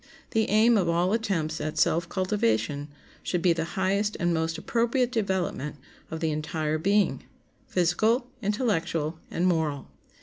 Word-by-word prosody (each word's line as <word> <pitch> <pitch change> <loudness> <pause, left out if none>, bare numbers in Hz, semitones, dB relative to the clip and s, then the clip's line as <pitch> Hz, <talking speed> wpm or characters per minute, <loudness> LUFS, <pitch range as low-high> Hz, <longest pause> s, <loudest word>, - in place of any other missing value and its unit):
The 220 -1 +1
aim 220 +3 +5
of 175 -3 +1
all 175 +3 +2
attempts 165 -9 -1
at 155 0 -3
self 165 +1 +2
cultivation 145 - 0 0.3
should 175 -2 -2
be 175 -2 +5
the 165 -1 -2
highest 200 +3 +1
and 175 -1 +1
most 160 0 -1
appropriate 240 +6 0
development 190 - -1 0.3
of 160 0 -5
the 160 -1 +1
entire 155 0 -2
being—physical, 200 - 0 0.2
intellectual, 170 - -1
and 175 - -1
moral. 160 -6 0
175 Hz, 135 wpm, -27 LUFS, 160-210 Hz, 0.3 s, aim